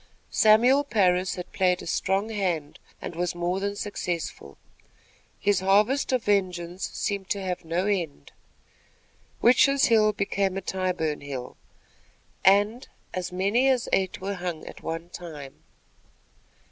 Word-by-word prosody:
Samuel 240 +6 +5
Parris 185 -8 +2
had 180 - -7
played 185 -3 +1
a - - -9
strong 195 +5 0
hand 180 -9 -2 0.2
and - - -6
was 175 0 -2
more 175 +2 -1
than 200 +1 -2
successful. 175 - -4 0.8
His 205 0 +2
harvest 210 +10 +2
of 255 -3 +1
vengeance 185 -3 -1
seemed 200 -2 -3
to 200 - -1
have 180 -1 -3
no 170 +3 -1
end. 170 - -2 1.1
Witches' 270 +3 +5
Hill 215 -1 +5
became 200 -2 -1
a - - -2
Tyburn 180 -5 -2
hill, 135 -3 -6 0.9
and 205 +6 +3 0.3
as 185 0 -3
many 200 +9 +2
as 255 -3 +1
eight 190 -1 +1
were 195 +2 -3
hung 180 -4 -5
at - - -10
one 165 +1 -5
time. 155 -7 -9
190 Hz, 135 wpm, -26 LUFS, 175-205 Hz, 1.1 s, Samuel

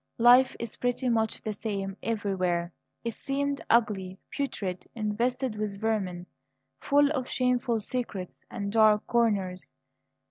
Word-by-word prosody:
Life 245 +2 +6
is 235 -2 -5
pretty 245 +1 0
much 225 -2 0
the 215 - -2
same 195 -2 -3
everywhere, 185 -6 -1 0.3
it 230 -1 -2
seemed; 280 +2 -2
ugly, 195 -5 +2
putrid, 195 -10 -3
infested 235 +3 -1
with 210 -2 -3
vermin, 195 -5 -1 0.5
full 290 +1 +3
of 260 -4 -2
shameful 250 -2 +1
secrets 210 -5 -4
and 200 0 -4
dark 215 -1 +5
corners. 200 - 0
220 Hz, 120 wpm, -28 LUFS, 195-245 Hz, 0.5 s, Life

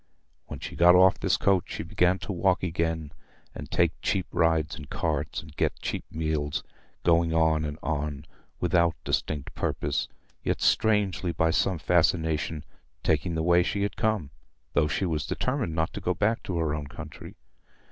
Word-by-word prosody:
When - - -7
she - - -7
got 90 +1 +7
off 95 +1 +6
this - - +2
coach, 95 -3 +2
she - - -5
began 90 +2 +2
to - - -4
walk 90 +1 +1
again, 80 -3 -1 0.4
and - - -8
take - - +3
cheap 95 -2 0
rides 80 -2 +2
in 75 -2 -9
carts, 75 +1 -2
and 75 -2 -14
get - - 0
cheap - - -4
meals, 75 -2 -2 0.4
going 85 -1 +3
on 80 -1 +3
and 75 0 -4
on 75 -2 -2 0.3
without 85 -1 +2
distinct 75 -3 -2
purpose, 75 +1 -1 0.4
yet - - 0
strangely, 100 -7 +2
by 80 0 +1
some 95 +1 +1
fascination, 80 -2 +1 0.4
taking 85 - +1
the 80 - 0
way 85 +1 +5
she 100 +3 -1
had 100 - -2
come, 110 -10 0 0.4
though 75 +1 +3
she 80 +6 -1
was 80 -4 -1
determined 125 - -1
not 80 0 0
to - - -6
go 90 - 0
back 105 +5 +1
to 90 - -4
her 80 -3 0
own 75 -2 -4
country. - - -10
80 Hz, 170 wpm, -27 LUFS, 75-90 Hz, 0.4 s, got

